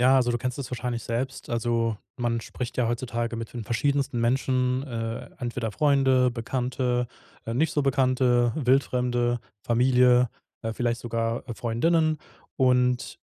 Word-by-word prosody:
Ja, 130 +2 +6
also 125 -2 +3
du 120 - +1
kennst 125 +3 -3
es 135 - -5
wahrscheinlich 120 -1 -3
selbst. 130 +3 -3
Also, 115 -1 0 0.2
man 120 -2 -1
spricht 120 -1 -6
ja 125 -2 +2
heutzutage 120 0 -2
mit 115 -1 -6
den 120 -2 -5
verschiedensten 140 +2 0
Menschen. 125 +1 +1
Äh, 115 -2 -4
entweder 120 -4 -3
Freunde, 135 -1 +3
Bekannte, 125 +1 -1 0.4
äh, 115 - -2
nicht 150 +5 +1
so 145 - +1
Bekannte, 130 -3 +3
Wildfremde, 125 -3 +1 0.2
Familie, 125 +1 +4 0.3
äh, 115 0 -3
vielleicht 120 0 -1
sogar 115 0 -2
Freundinnen. 155 +8 +1 0.4
Und 125 -1 +2
125 Hz, 140 wpm, -26 LUFS, 120-130 Hz, 0.4 s, Ja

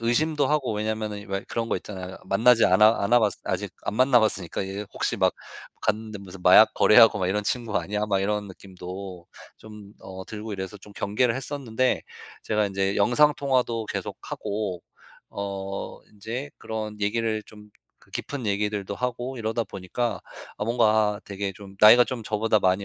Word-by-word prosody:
의심도 145 +5 +1
하고 140 -5 0
왜냐하면은 105 -1 -3
왜 95 0 -3
그런 115 -1 -2
거 - - 0
있잖아요. 95 -2 -7
만나지 115 +4 +4
않아 105 +5 +5
않아 115 +5 +4
봤으 105 -4 +1
아직 - - -3
안 - - -3
만나 130 +1 +5
봤으니까 100 -6 0
이제 100 +2 -5
'혹시 - - -1
막 - - +3 0.5
갔는데 110 0 -2
무슨 95 -1 -11
마약 95 +5 +7
거래하고 110 -1 +6
막 95 - 0
이런 105 +2 -1
친구 115 -1 -1
아니야?' 105 +1 -2
막 100 -2 +1
이런 105 +1 -1
느낌도 95 -1 -9 0.3
좀 105 -2 -12
어 95 0 -9
들고 110 0 -7
이래서 95 +2 -6
좀 105 +1 -15
경계를 115 +5 0
했었는데 130 -3 -1 0.4
제가 105 -1 +1
인제 95 0 -1
영상 135 +8 +4
통화도 125 -5 0
계속 - - -5
하고 100 -4 -4 0.5
어 100 -1 -5
인제 115 +7 -6
그런 110 -1 -5
얘기를 110 +1 0
좀 105 0 -15 0.3
그 - - -24
깊은 140 -4 -5
얘기들도 100 -1 -1
하고 125 +1 -3
이러다 115 +1 -1
보니까 100 +2 -3 0.4
아 - - -2
뭔가 110 -3 +2
되게 100 -1 -4
좀 100 0 -12
나이가 120 +3 +9
좀 125 -2 -5
저보다 110 0 +1
많이 95 +1 +2
105 Hz, 350 characters per minute, -25 LUFS, 100-115 Hz, 0.5 s, 나이가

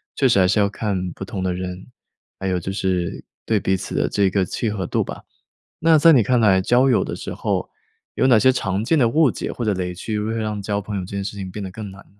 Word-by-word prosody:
确 135 - +3
实 115 -5 +3
还 95 - +5
是 105 +3 +2
要 100 - +4
看 100 -3 -3
不 - - -8
同 105 -6 -5
的 90 -1 0
人， 90 +2 -6 0.5
还 95 - -3
有 90 -1 0
就 90 +3 -5
是 90 -3 -2 0.2
对 110 - +2
彼 95 0 0
此 - - -6
的 - - +1
这 100 -2 +2
个 95 0 +1
契 110 +5 -2
合 100 -4 -3
度 - - 0
吧。 - - -8 0.6
那 160 -1 +5
在 165 +2 +7
你 130 - +6
看 125 +4 +2
来 100 -4 +4
交 125 +6 +3
友 120 - +3
的 - - -4
时 - - -6
候， - - -2 0.5
有 130 - +2
哪 125 -4 +6
些 130 +4 +5
常 95 -4 -2
见 155 +6 +2
的 120 - +4
误 150 +3 +3
解 - - -5
或 120 - -5
者 105 -3 +1
雷 90 -1 -3
区 105 +4 -4
会 110 +2 -2
让 105 -2 -3
交 100 +1 -2
朋 105 +1 -6
友 - - -2
这 90 - -12
件 100 - -2
事 100 +1 -6
情 95 -1 -5
变 105 +2 -6
得 95 - -6
更 105 +1 -7
难？ 95 +1 -14
100 Hz, 290 characters per minute, -21 LUFS, 95-115 Hz, 0.6 s, 在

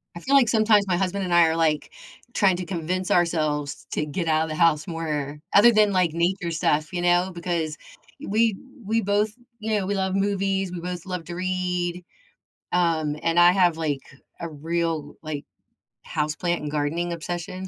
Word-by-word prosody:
I - - -6
feel 275 +10 +1
like, 255 -5 +5
sometimes, 215 -2 +4
my 180 -2 +1
husband 195 +1 -1
and 180 -2 -2
I 170 -1 +6
are, 160 - 0
like, 155 -2 0 0.4
trying 195 -3 +3
to 180 - -4
convince 180 +2 -3
ourselves 155 -4 0
to 150 - -1
get 165 +3 -3
out 155 0 +3
of 160 - -4
the 155 - -3
house 155 -1 +3
more, 150 -4 -3
other 220 +4 +8
than, 215 -2 +4
like, 180 -3 +2
nature 170 +1 0
stuff, 155 0 0
you 175 - -2
know, 175 +1 +2
because 170 -3 -2 0.5
we 220 0 +2 0.3
we 225 +3 +1
both, 205 +1 +1 0.3
you 215 0 0
know, 195 - -1
we 200 +2 -1
love 190 -1 -1
movies, 195 -1 0
we 180 - -5
both 180 0 -5
love 180 -3 -5
to 175 +2 -7
read, 180 -1 -2 0.7
um, 160 -4 +1
and 165 +1 +1
I 175 0 +7
have, 180 -3 +3
like, 150 -4 -2 0.4
a 170 - -4
real, 160 -1 -3
like, 155 -2 -5 0.6
houseplant 155 +3 -1
and 150 -2 -5
gardening 155 +4 -1
obsession 175 +2 -5
175 Hz, 185 wpm, -24 LUFS, 160-190 Hz, 0.7 s, other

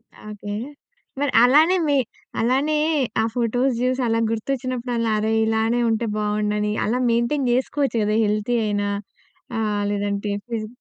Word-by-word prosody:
ఆ! - - -17
ఓకే. 205 0 -6 0.7
మరి 285 -2 0
అలానే, 305 +8 +5
మి 285 - +2 0.4
అలానే 270 +6 +1 0.4
ఆ - - +1
ఫోటోస్ 245 +2 +1
జూసలా 250 -3 +1
గుర్తొచ్చినప్పుడలా 240 -1 -2
అరే! 220 +1 0
ఇలానే 225 +2 +1
ఉంటే 225 +1 0
బావుండునని. 210 0 0
అలా 245 +4 0
మెయింటైన్ 245 +3 +1
జేసుకోవచ్చు 260 0 0
కదా, 210 +1 +1
హెల్తీ 210 +3 0
అయినా. 205 -1 -1 0.7
ఆహ్, 210 -2 0
లేదంటే, 205 0 -2 0.2
ఫిజి 225 -2 -3
230 Hz, 130 wpm, -22 LUFS, 210-255 Hz, 0.7 s, అలానే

